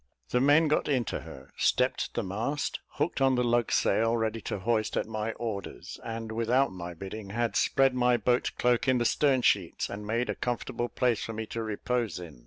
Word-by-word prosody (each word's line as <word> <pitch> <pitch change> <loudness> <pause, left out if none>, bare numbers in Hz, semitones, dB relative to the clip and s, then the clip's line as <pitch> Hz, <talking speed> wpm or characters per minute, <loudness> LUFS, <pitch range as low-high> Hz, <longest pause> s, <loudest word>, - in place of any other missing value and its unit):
The 125 - +2
men 145 +4 +5
got 150 - +1
into 130 -6 0
her, - - -12
stepped - - +1
the - - 0
mast, 115 +10 -2
hooked 150 -1 -1
on 135 -1 +4
the 125 - +2
lug 120 -1 +1
sail, 115 +3 +2
ready 110 0 -1
to - - -3
hoist 110 +2 0
at - - 0
my 110 0 -3
orders; 110 -4 -6
and, 115 -1 -5
without 115 +4 +2
my 90 -2 -7
bidding, 95 +4 -7
had 115 +3 -1
spread 135 -1 +3
my 125 -1 +3
boat 120 +2 +1
cloak 125 +3 +2
in 130 -1 +4
the 120 - 0
stern 135 -1 +3
sheets, 95 -7 +1
and 105 +1 -6
made 115 +3 0
a - - -2
comfortable 120 0 -3
place 120 -1 +1
for 115 - -5
me 110 0 -4
to 115 +1 -5
repose 115 +2 -2
in. 85 -7 -9
115 Hz, 200 wpm, -29 LUFS, 110-125 Hz, -, men